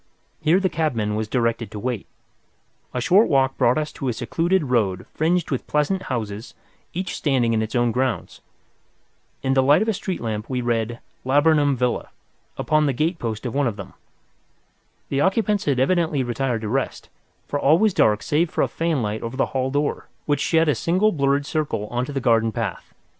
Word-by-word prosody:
Here 165 +4 +4
the 195 - +1
cabman 125 - -1
was 110 0 -2
directed 115 -1 0
to 105 - -8
wait. 120 -2 -3 0.8
A 125 - -3
short 185 - +4
walk 135 -2 +2
brought 120 +4 +3
us 155 -1 -2
to 135 - -5
a 125 - +1
secluded 165 +10 0
road 105 -9 0
fringed 170 +2 0
with 130 - -2
pleasant 150 +6 +1
houses, 110 -3 -4 0.4
each 185 +2 -4
standing 130 -6 +1
in 110 - +1
its 110 +2 -4
own 120 -1 +2
grounds. 125 -1 -2 1.0
In 135 0 +1
the 135 - +4
light 145 +9 +5
of - - -5
a 220 - +2
street 185 -1 -4
lamp 110 -1 -4
we 130 -1 -1
read 120 -1 -1 0.3
"Laburnum 145 +1 +3
Villa" 125 -1 -1 0.5
upon 155 -1 +2
the 140 - +1
gate 160 +6 -1
post 110 0 -4
of 120 - -3
one 140 -1 +1
of 115 - -2
them. 100 -2 -9 1.2
The 140 - 0
occupants 205 +2 +1
had 140 -3 +1
evidently 155 -1 +2
retired 120 -1 -1
to 110 - -4
rest, 135 +5 -2 0.4
for 145 - -2
all 150 +4 +5
was 215 +1 +3
dark 105 -9 +3
save 160 +3 +1
for - - 0
a - - +1
fanlight 130 -11 -1
over 115 +3 -5
the - - 0
hall 130 -1 0
door, 145 +2 -1 0.2
which 145 -2 +1
shed 165 -1 +2
a 150 - +4
single 185 +9 +2
blurred 140 -3 +1
circle 150 -9 -2
on 120 +1 -1
to 145 - -7
the 140 - -2
garden 115 -2 +2
path. 110 -4 -4
135 Hz, 195 wpm, -23 LUFS, 115-155 Hz, 1.2 s, light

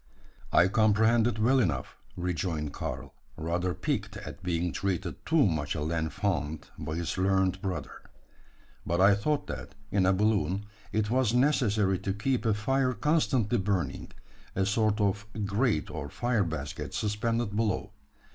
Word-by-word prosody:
"I 90 - +6
comprehend 110 +3 +4
it 115 -3 -1
well 125 +5 +4
enough," 75 - -1 0.2
rejoined 85 -4 -2
Karl, - - -5 0.2
rather 85 +3 -1
piqued - - -2
at - - -8
being 90 -1 -1
treated 95 -3 -2
too 160 -4 +4
much 80 -6 0
a 75 - -2
l'enfant 80 0 -2
by 75 +1 -4
his 85 +2 -2
learned 95 0 +2
brother. 90 -5 -4 0.8
"But 85 +1 -1
I 100 +2 +7
thought 145 +9 0
that, - - -7 0.2
in 95 -1 +3
a - - +5
balloon, 100 -1 +1 0.3
it 110 0 0
was 125 -2 +2
necessary 110 -8 +3
to 95 - -2
keep 115 +4 0
a 110 - +3
fire 130 +4 +1
constantly 125 -3 +1
burning 95 -8 -2 0.4
a 95 - +2
sort 105 +1 +1
of 100 0 0 0.2
grate 105 - +1
or 75 -2 -5
fire 120 +1 +1
basket 80 -5 -5
suspended 110 +1 -1
below. 110 -3 0
100 Hz, 145 wpm, -29 LUFS, 85-110 Hz, 0.8 s, I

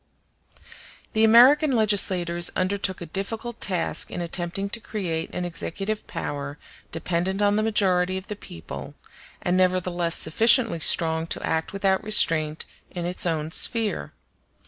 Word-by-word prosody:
The 220 - +2
American 260 +6 +6
legislators 185 -6 +2
undertook 190 0 -1
a - - -5
difficult 220 +7 -5
task 180 -4 0
in - - -6
attempting 175 +2 -2
to 230 - -1
create 175 -8 -4
an 180 - -4
executive 195 +5 -5
power 145 0 -5 0.3
dependent 175 +3 -2
on 205 0 +3
the 215 - +1
majority 185 -4 +1
of 190 - -7
the 210 - -6
people, 80 - -10 0.5
and 180 - +1
nevertheless 180 -2 +1
sufficiently 225 - +3
strong 160 0 +2
to - - -5
act 160 0 -1
without 195 -1 0
restraint 165 -7 +2 0.2
in 175 -1 -5
its 180 0 -2
own 160 -1 -2
sphere. 210 - +2
185 Hz, 135 wpm, -24 LUFS, 170-210 Hz, 0.5 s, American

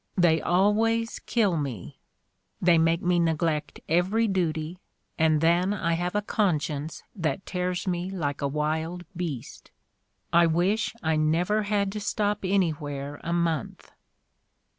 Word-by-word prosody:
They 165 -3 +4
always 225 +5 +2
kill 205 -8 +1
me 130 - -5 0.3
— - - -49
they 175 -2 +4
make 165 +1 +2
me 175 -1 +2
neglect 160 -2 0
every 190 +8 +2
duty 170 -3 -1 0.4
and 155 -1 +3
then 175 +4 +3
I 170 -4 0
have 175 +3 -2
a 210 - +1
conscience 155 -7 -1
that 180 +1 -2
tears 180 -1 -2
me 180 0 -1
like 150 -7 -3
a 140 - +1
wild 160 +4 -2
beast. 165 -8 -5 0.6
I 170 0 +6
wish 180 +8 +1
I 160 -1 +1
never 170 +7 +2
had 205 -1 0
to 210 - -4
stop 210 0 0
anywhere 150 -7 -1
a 170 - -3
month." 170 -6 -2
175 Hz, 140 wpm, -26 LUFS, 160-195 Hz, 0.6 s, I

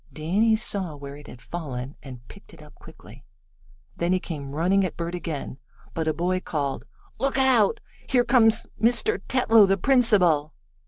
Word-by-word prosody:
Danny 200 +9 +1
saw 200 -7 -3
where 140 -1 -9
it 145 0 -14
had 125 -1 -13
fallen, 140 -5 -6
and 125 -3 -12
picked - - -15
it - - -15
up - - -17
quickly. - - -16 0.7
Then 170 +1 -1
he 185 - +1
came 150 -7 -7
running 185 +5 +2
at 185 - -4
Bert 170 0 -4
again, 160 -6 -6 0.3
but 160 -1 -3
a - - +3
boy 180 +3 -1
called: 145 -6 -4 0.3
"Look 270 +2 -1
out! 245 -5 +3 0.3
Here 245 -2 +2
comes 230 -2 +4 0.2
Mr. 245 - +2
Tetlow, 225 -5 +4
the 195 0 +2
principal!" 190 - +3
180 Hz, 165 wpm, -24 LUFS, 150-225 Hz, 0.7 s, comes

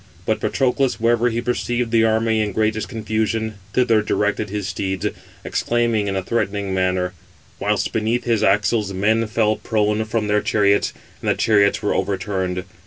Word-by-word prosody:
But - - 0
Patroclus, 135 0 0
wherever 120 +1 +2
he 115 0 -2
perceived 120 -1 -1
the 115 -1 +4
army 110 0 +2
in 105 -2 -2
greatest 110 +1 0
confusion, 110 -1 -2
thither 115 -4 +3
directed 105 0 -1
[his 100 -1 -3
steeds], 95 0 -3 0.4
exclaiming 115 -3 0
in 100 - -1
a 95 - -1
threatening 100 -3 -1
manner; 95 -1 0 0.5
whilst 105 +1 0
beneath 110 +2 0
his 115 -3 +1
axles 105 +1 +2
men 110 +4 +1
fell 110 0 +1
prone 105 -1 0
from 110 -1 -1
their 105 0 +2
chariots, 100 -1 +2 0.3
and - - -1
the - - +3
chariots 105 -1 +3
were 105 - +1
overturned. 95 -2 -2
110 Hz, 160 wpm, -21 LUFS, 100-115 Hz, 0.5 s, the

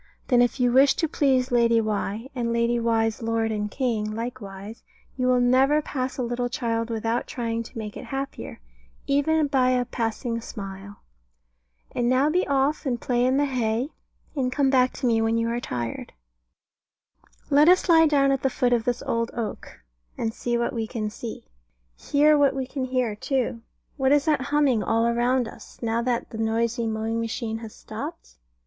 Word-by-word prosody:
Then 245 -2 +5
if 245 +2 +1
you 245 -1 +3
wish 270 +3 +5
to 325 - 0
please 265 -4 +1
Lady 235 -1 +4
Why, 215 +1 -2
and 240 -3 -2
Lady 235 +1 +1
Why's 225 -1 0
Lord 225 0 0
and 210 -1 -2
King 215 -4 -2
likewise, 220 -3 -7 0.3
you 255 -1 0
will 250 0 +4
never 260 +4 +4
pass 260 -3 -4
a 255 - -1
little 245 +1 -2
child 230 -2 -2
without 225 +1 -1
trying 230 -2 -3
to 230 - -10
make 210 -2 -6
it - - -8
happier, 275 0 -5 0.5
even 295 +3 +2
by 265 -3 +2
a 250 -1 +2
passing 230 0 -3
smile. 195 -2 -9 0.9
And 240 0 0
now 265 +4 +3
be 360 +3 +1
off, 280 +2 +1
and 245 -2 -1
play 245 0 0
in 260 +2 +2
the 290 - +3
hay, 245 -1 -1 0.5
and 255 -3 0
come 270 0 +2
back 255 -1 +4
to 270 - -5
me 230 -2 +3
when 225 +1 +1
you 230 0 0
are 235 +1 -1
tired. 120 - -5 1.4
Let 295 +3 +6
us 370 +2 +4
lie 325 -2 +6
down 275 -2 +3
at 270 -1 0
the 270 - +2
foot 245 -1 +1
of 230 -2 +1
this 245 -1 -1
old 230 0 -1
oak, 225 - -6 0.3
and 225 -1 -2
see 240 +1 -1
what 235 +3 -1
we 225 -2 -2
can 215 -3 -3
see. 225 +1 -7 0.6
And - - -17
hear 300 +1 +5
what 280 -1 +3
we 265 -1 -2
can 265 0 -4
hear, 250 -4 -1
too. 240 0 -2 0.4
What 265 -1 +2
is 290 -1 +4
that 300 -4 +2
humming 280 -4 +2
all 230 +2 +1
round 245 +1 +1
us, - - -13
now 230 0 0
that 240 -1 -2
the 220 - -6
noisy 230 +1 0
mowing 220 +1 -2
machine 225 0 -3
has 225 -2 -9
stopped? 290 +10 -8
240 Hz, 190 wpm, -25 LUFS, 225-265 Hz, 1.4 s, Let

